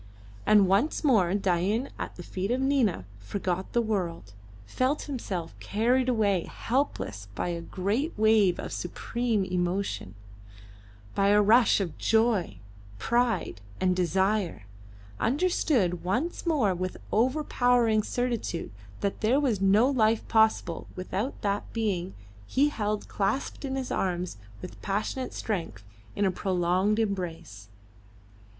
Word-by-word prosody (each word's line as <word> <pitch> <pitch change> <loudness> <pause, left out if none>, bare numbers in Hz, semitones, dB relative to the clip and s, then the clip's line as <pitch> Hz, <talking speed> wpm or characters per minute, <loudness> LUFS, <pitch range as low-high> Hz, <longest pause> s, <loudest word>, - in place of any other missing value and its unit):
And 210 -2 +6
once 205 - +1
more 215 - +4
Dain, 195 +6 0
at - - -5
the 175 - -9
feet 190 +3 -4
of 250 +2 +1
Nina, 265 - +1
forgot 185 - -3
the 235 - +2
world, 175 - -3 0.3
felt 255 - 0
himself 190 - -4
carried 245 +5 +1
away 205 -7 +2
helpless 225 - -2
by 175 - -2
a 170 -1 -3
great 205 - -1
wave 215 -4 +4
of - - -5
supreme 225 +3 -1
emotion, 180 - -2 1.0
by 195 - +2
a 205 +1 +5
rush 220 +3 +5
of 185 -5 -4
joy, 220 - +2 0.4
pride, 235 - 0 0.2
and 185 -1 +2
desire; 190 - 0 0.6
understood 250 - +1
once 255 - -2
more 265 - +2
with 185 +1 -4
overpowering 245 -2 +2
certitude 235 - -2 0.3
that 200 - -2
there 240 +6 +3
was 240 -9 0
no 200 +5 +5
life 225 -5 +2
possible 220 -6 +2
without 190 +7 -3
that 200 0 -1
being 195 -5 -2 0.3
he 285 +3 +3
held 210 -6 -2
clasped 210 +10 -2
in 265 -1 -3
his 265 -1 -3
arms 180 - -2 0.3
with 180 - -9
passionate 215 +6 -2
strength 165 - -4 0.3
in 205 - +1
a 190 - +2
prolonged 185 +2 +1
embrace. 175 - -3
205 Hz, 125 wpm, -28 LUFS, 180-240 Hz, 1.0 s, And